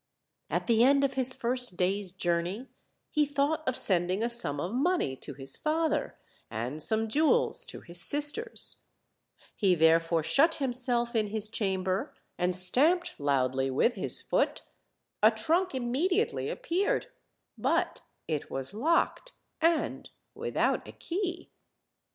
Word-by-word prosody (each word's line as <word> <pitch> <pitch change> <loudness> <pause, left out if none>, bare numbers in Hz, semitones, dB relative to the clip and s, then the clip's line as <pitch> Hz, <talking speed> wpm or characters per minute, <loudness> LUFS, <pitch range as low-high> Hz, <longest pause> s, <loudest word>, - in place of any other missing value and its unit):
At - - -2
the 230 -1 +3
end 280 +2 +3
of 275 - 0
his 260 -1 +1
first 245 -5 +1
day's 190 +1 -1
journey 175 +5 -3 0.5
he 300 - +2
thought 285 +2 -1
of 255 - 0
sending 185 +1 +2
a 235 - -2
sum 185 -12 -2
of 175 +8 -4
money 275 - -1
to - - -9
his 135 -1 -4
father, 315 0 -2 0.3
and 120 +7 -5
some 220 +6 +3
jewels 320 - +1
to - - -10
his 170 -1 -5
sisters; 295 - +4 0.7
he 190 -4 +2
therefore 165 0 +2
shut 320 - +2
himself 245 -3 0
in 215 -2 0
his 215 0 -3
chamber, 190 -3 -3 0.2
and 180 0 -1
stamped 305 - +6
loudly 135 -2 0
with 140 - +1
his 200 - 0
foot; - - -1 0.6
a - - +6
trunk 345 0 -1
immediately 315 - -1
ap - - -8
peared 405 +4 -1 0.5
but - - -1 0.3
it 155 -3 -4
was 135 +5 -2
locked, 335 - -1 0.3
and 330 -1 -1 0.2
without - - -2
a - - -11
key. 355 -1 -5
235 Hz, 140 wpm, -28 LUFS, -, 0.7 s, stamped